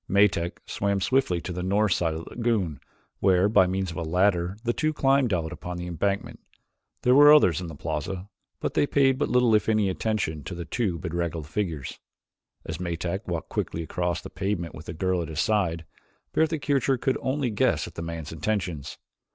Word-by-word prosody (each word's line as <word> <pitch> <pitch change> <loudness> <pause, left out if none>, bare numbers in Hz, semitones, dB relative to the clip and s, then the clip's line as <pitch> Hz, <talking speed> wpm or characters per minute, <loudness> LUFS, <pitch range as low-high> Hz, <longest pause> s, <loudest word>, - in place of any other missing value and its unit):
Metak 95 -3 +2
swam 100 0 -1
swiftly 95 -3 +1
to 90 - -5
the 90 - -4
north 100 +3 +2
side 80 -2 0
of 80 - -5
the - - -12
lagoon 110 - -1 0.4
where, 95 0 +4
by 95 -3 +5
means 95 -1 -1
of 85 - -8
a - - -2
ladder, 90 +2 +1
the 120 -1 +1
two 155 +3 0
climbed 135 -4 +3
out 85 -3 -1
upon 90 0 -6
the 90 - -5
embankment. 95 +4 -2 0.6
There 125 - +5
were 145 +2 +9
others 90 - +5
in 90 - -5
the 80 - -8
plaza 80 +6 -4 0.3
but - - -2
they 145 - +2
paid 135 -2 +3
but 145 - 0
little 125 -2 +4
if 105 +1 +3
any 110 -3 +3
attention 95 -7 -2
to 90 - -5
the 85 -1 -5
two 95 -2 -1
bedraggled 85 -2 -3
figures. 80 -4 -4 0.7
As 80 0 -5
Metak 90 +3 -3
walked 85 -2 -3
quickly 85 - -2
across 85 +1 -2
the - - -9
pavement 95 -4 -2
with 80 - -10
the - - -4
girl 90 +2 0
at 85 - -4
his 80 -2 -5
side, 90 -6 +1 0.5
Bertha 160 0 +2
Kircher 135 -3 +1
could 130 +2 0
only 130 -2 -1
guess 105 - +1
at - - -10
the - - -6
man's 85 -2 -5
intentions. 90 -3 -3
95 Hz, 200 wpm, -26 LUFS, 85-110 Hz, 0.7 s, were